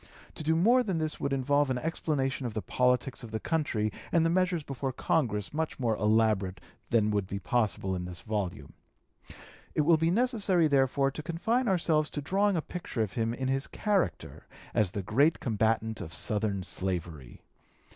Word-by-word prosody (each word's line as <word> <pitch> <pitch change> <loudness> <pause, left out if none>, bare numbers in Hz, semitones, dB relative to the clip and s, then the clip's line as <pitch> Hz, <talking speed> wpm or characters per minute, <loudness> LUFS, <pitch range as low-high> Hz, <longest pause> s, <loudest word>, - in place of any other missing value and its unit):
To - - -7
do 160 +1 +1
more 235 +10 +5
than 195 -8 -1
this 155 -1 -2
would 140 - -2
involve 140 +1 +2
an 130 - 0
explanation 135 -2 -1
of 110 - -7
the 110 - -1
politics 125 +1 +1
of 120 - -8
the 110 0 -3
country 115 -10 -1 0.2
and 165 -1 +3
the 165 - +2
measures 180 -2 +1
before 135 -1 -3
Congress 115 -6 -1
much 160 -1 -2
more 115 -4 +1
elaborate 105 -4 +2 0.3
than 105 -2 +3
would 100 -2 0
be 100 - -4
possible 100 -1 0
in 90 -1 -4
this 90 -1 -6
volume. 100 -2 -4 1.0
It - - +3
will 160 +2 +5
be 165 +1 +1
necessary, 200 - +2
therefore, 135 -1 +2
to 155 - -6
confine 220 +11 0
ourselves 160 -5 +2
to - - -4
drawing 195 +6 +1
a 160 - -1
picture 165 -10 -3
of 100 - -5
him 115 0 -1
in 130 0 -3
his 135 +1 0
character 195 - -2 0.3
as 105 -4 +2
the 100 +2 -4
great 140 - +3
combatant 110 -1 0
of 80 -4 -6
Southern 105 0 0
slavery. 85 -9 -4
130 Hz, 180 wpm, -29 LUFS, 105-160 Hz, 1.0 s, more